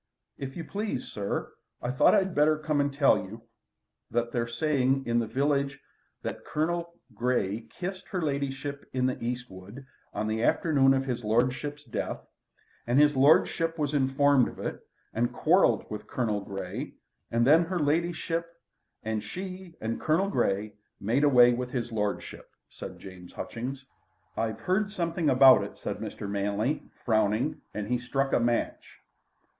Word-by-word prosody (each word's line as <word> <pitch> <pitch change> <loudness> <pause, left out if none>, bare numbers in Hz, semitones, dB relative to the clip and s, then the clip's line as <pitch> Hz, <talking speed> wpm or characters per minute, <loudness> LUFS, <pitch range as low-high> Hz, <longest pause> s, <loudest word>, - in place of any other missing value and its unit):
"If 135 +1 -6
you 170 - -4
please, 200 - -4
sir, 100 -1 -3 0.3
I 120 - -2
thought 130 - +5
I'd 190 -3 +2
better 155 0 +4
come 150 -1 0
and 145 0 0
tell 140 0 +4
you 110 +4 -9 0.7
that 120 +1 -1
they're 120 -1 -1
saying 135 +1 +1
in 120 0 +2
the 115 - -1
village 140 +3 0 0.4
that - - -5
Colonel 170 +2 -2 0.2
Grey 110 -2 -1
kissed 185 +1 -6
her 185 - -3
ladyship 140 -2 -3
in 130 -1 +1
the 130 -2 -1
East 125 +1 -2
wood 100 +8 -11 0.3
on 110 - -2
the 110 +1 -1
afternoon 135 0 +4
of 135 0 0
his 125 -2 -3
lordship's 130 +6 0
death, 120 - -4 0.7
and 120 +3 +3
his 150 -1 +5
lordship 165 +4 +4
was 150 -1 -1
informed 140 -1 +4
of - - -9
it - - -4 0.3
and 120 +2 0
quarrelled 155 - +3
with 105 - -6
Colonel 110 -5 -1
Grey 95 -2 -5 0.4
and 115 0 +2
then 160 +5 +6
her 180 +2 -2
ladyship, 170 +2 0 0.6
and 110 -1 -2
she 185 - -7
and 115 +1 -3
Colonel 170 +6 +2
Grey 105 - 0 0.3
made 120 +8 +1
away 125 -4 +7
with 125 +1 -3
his 120 -2 -3
lordship," 105 -2 -3 0.2
said - - -8
James 95 -2 -11
Hutchings. 130 +3 -5 0.5
"I've 110 -1 -2
heard 200 +3 +1
something 170 -5 -1
about 130 0 +7
it," - - -8
said - - -4
Mr. - - -6
Manley, 100 +7 -1 0.2
frowning, 110 +4 +1
and 105 -1 -4
he 125 +1 0
struck 135 +3 -1
a - - +4
match. 120 0 -1
130 Hz, 160 wpm, -28 LUFS, 115-150 Hz, 0.7 s, away